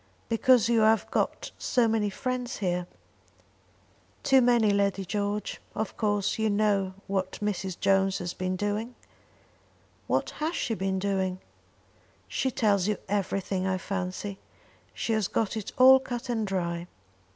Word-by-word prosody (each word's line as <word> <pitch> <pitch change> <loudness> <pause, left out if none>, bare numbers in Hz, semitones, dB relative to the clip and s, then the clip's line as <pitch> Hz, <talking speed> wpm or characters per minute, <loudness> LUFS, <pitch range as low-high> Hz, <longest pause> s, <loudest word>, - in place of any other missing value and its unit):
"Because 230 0 +4
you 235 -1 +3
have 220 0 +3
got - - -1
so 245 -2 +2
many 220 -2 +1
friends 255 +4 -3
here." 180 -3 -1 1.4
"Too 270 -2 +5
many, 240 -3 +4
Lady 200 -1 +1
George. 205 +2 -2
Of 220 -1 -3
course 205 -1 0
you 220 0 +2
know 200 -2 +1
what 190 -1 -2
Mrs. 195 -3 -3
Jones 195 0 +3
has 175 0 -4
been 185 0 -2
doing?" 210 +5 -2 1.1
"What 130 +2 0
has 320 +3 0
she 230 - -1
been 190 -2 -1
doing?" 190 -1 -1 0.9
"She 265 - -1
tells 205 -6 +2
you 210 -2 0
everything, 195 -1 -1
I 190 -1 +1
fancy. 195 +1 -4 0.6
She 230 - -1
has 215 -3 +1
got 220 -2 -1
it 215 -3 -4
all 265 +1 +8
cut 245 -1 -6
and 225 -3 0
dry. 170 -2 -2
205 Hz, 140 wpm, -28 LUFS, 190-225 Hz, 1.4 s, all